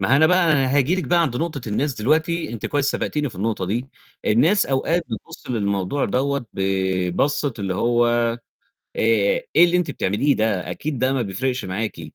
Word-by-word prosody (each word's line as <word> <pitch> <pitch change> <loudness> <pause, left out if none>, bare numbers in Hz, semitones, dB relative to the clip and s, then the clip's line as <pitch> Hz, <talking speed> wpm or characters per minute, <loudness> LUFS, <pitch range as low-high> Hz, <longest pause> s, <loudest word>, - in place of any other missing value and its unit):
ما 95 +7 +1
هو - - +7
أنا 155 +2 +5
بقى 175 -3 +4
هاجي 140 +5 +2
لِك 185 -3 -2
بقى 170 +5 +3
عند 135 -7 -1
نقطة 160 -2 -3
الناس 135 +7 -1
دلوقتي، 155 +4 0
أنتِ 115 - -4
كويس 145 -2 0
سبقتيني 150 -2 -2
في 110 - -13
النقطة 105 -1 -1
دي. 120 +7 -2 0.4
الناس 160 - +3
أوقات 160 +6 0
بتبُص 110 +3 -8
للموضوع 100 +3 -1
دَوَّة 140 -1 -1
ببصّة 95 - 0
اللي 95 -2 -2
هو 120 +3 +2
آآ 120 0 +1 0.6
"إيه - - +2
اللي 175 +1 +2
أنتِ 175 -4 -1
بتعمليه 135 +6 +1
ده؟ 110 -4 -1
أكيد 145 -5 -4
ده 130 +1 +1
ما 130 - 0
بيفرقش 125 +5 -2
معاكِ". 95 -2 -4
130 Hz, 180 wpm, -22 LUFS, 105-150 Hz, 0.6 s, هو